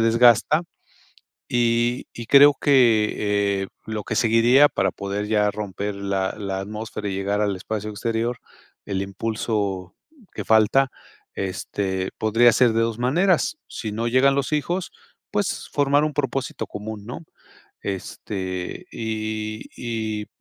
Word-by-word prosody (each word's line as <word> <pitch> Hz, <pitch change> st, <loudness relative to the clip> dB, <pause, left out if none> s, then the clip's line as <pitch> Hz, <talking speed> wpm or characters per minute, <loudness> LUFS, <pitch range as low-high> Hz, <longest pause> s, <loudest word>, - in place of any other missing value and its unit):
desgasta 120 Hz, +7 st, +5 dB, 0.9 s
y 120 Hz, 0 st, +1 dB
y 120 Hz, -, -6 dB
creo 140 Hz, +3 st, +8 dB
que, 105 Hz, -6 st, +3 dB
eh, -, -, -6 dB, 0.2 s
lo 110 Hz, -1 st, -3 dB
que -, -, -3 dB
seguiría 120 Hz, +5 st, +5 dB
para 95 Hz, -2 st, 0 dB
poder 100 Hz, +1 st, -4 dB
ya 105 Hz, -1 st, +2 dB
romper 105 Hz, 0 st, -4 dB
la 100 Hz, -1 st, -1 dB
la 95 Hz, -2 st, -3 dB
atmósfera 105 Hz, +1 st, -6 dB
y 95 Hz, -, -3 dB
llegar 100 Hz, +2 st, -1 dB
al 100 Hz, -1 st, +1 dB
espacio 105 Hz, +2 st, -4 dB
exterior, 115 Hz, +3 st, -2 dB, 0.5 s
el 95 Hz, -1 st, -2 dB
impulso 100 Hz, -2 st, -3 dB, 0.4 s
que -, -, -5 dB
falta, 110 Hz, +5 st, +4 dB, 0.4 s
este, 95 Hz, 0 st, -3 dB
podría 115 Hz, +2 st, +4 dB
ser 120 Hz, +1 st, +4 dB
de 115 Hz, -, +2 dB
2 115 Hz, -1 st, -1 dB
maneras. 175 Hz, -, +2 dB
Si 110 Hz, -2 st, -5 dB
no 115 Hz, +2 st, -1 dB
llegan 130 Hz, +3 st, +4 dB
los 140 Hz, +1 st, -1 dB
hijos, 170 Hz, +5 st, -1 dB, 0.4 s
pues 205 Hz, -1 st, -2 dB
formar 145 Hz, +1 st, +3 dB
un 155 Hz, -, -1 dB
propósito 135 Hz, -2 st, -2 dB
común, 105 Hz, 0 st, -7 dB
¿no? 125 Hz, -, -6 dB, 0.6 s
Este, 95 Hz, -1 st, -5 dB
y 110 Hz, -1 st, -4 dB
y 110 Hz, -3 st, -3 dB
110 Hz, 130 wpm, -23 LUFS, 100-120 Hz, 0.9 s, creo